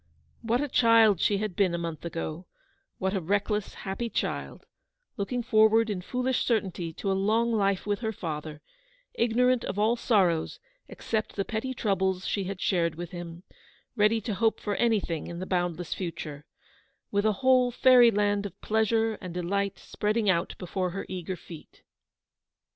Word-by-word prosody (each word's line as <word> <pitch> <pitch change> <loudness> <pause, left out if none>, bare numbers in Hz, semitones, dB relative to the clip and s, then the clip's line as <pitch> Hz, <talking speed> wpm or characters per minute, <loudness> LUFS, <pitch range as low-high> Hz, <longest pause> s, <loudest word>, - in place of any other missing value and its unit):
What 235 +3 0
a 290 - -1
child 230 - +5
she 205 - +3
had 210 -3 -3
been 185 -3 +2
a - - -1
month 165 -2 -5
ago; 165 +1 -5 0.5
what 190 +1 -1
a 195 - -1
reckless, 205 +4 -1
happy 200 +5 -4
child, - - -3 0.5
looking 240 +5 -2
forward 220 -1 +4
in 185 -3 -3
foolish 250 +6 -1
certainty 190 -7 -1
to 195 - -2
a - - +2
long 220 +5 +1
life 200 -3 +1
with 205 -1 -1
her 220 -2 -2
father; 155 -5 -6 0.5
ignorant 245 +1 +2
of - - -4
all 220 +3 +3
sorrows 190 -9 +1 0.3
except 220 -1 -3
the 195 - -1
petty 230 +6 -3
troubles 190 -4 0
she 200 -2 -1
had 190 0 -5
shared 170 -4 +1
with 175 0 -7
him; 175 0 -8 0.5
ready 215 +2 +3
to 220 - -3
hope 225 +2 +1
for 205 - -2
anything 205 -9 0
in 170 - -6
the 185 - -4
boundless 175 -2 -1
future; 160 -5 -6 0.7
with 200 0 +1
a 215 0 +3
whole 255 -1 +5
fairy 245 0 +6
land 205 -1 +1
of - - -16
pleasure 220 0 +1
and 180 -3 -7
delight 195 +3 -1
spreading 210 +1 -1
out 180 -2 +1
before 185 0 -2
her 195 +3 -5
eager 185 0 -4
feet 165 -2 -13
200 Hz, 165 wpm, -28 LUFS, 180-225 Hz, 0.7 s, fairy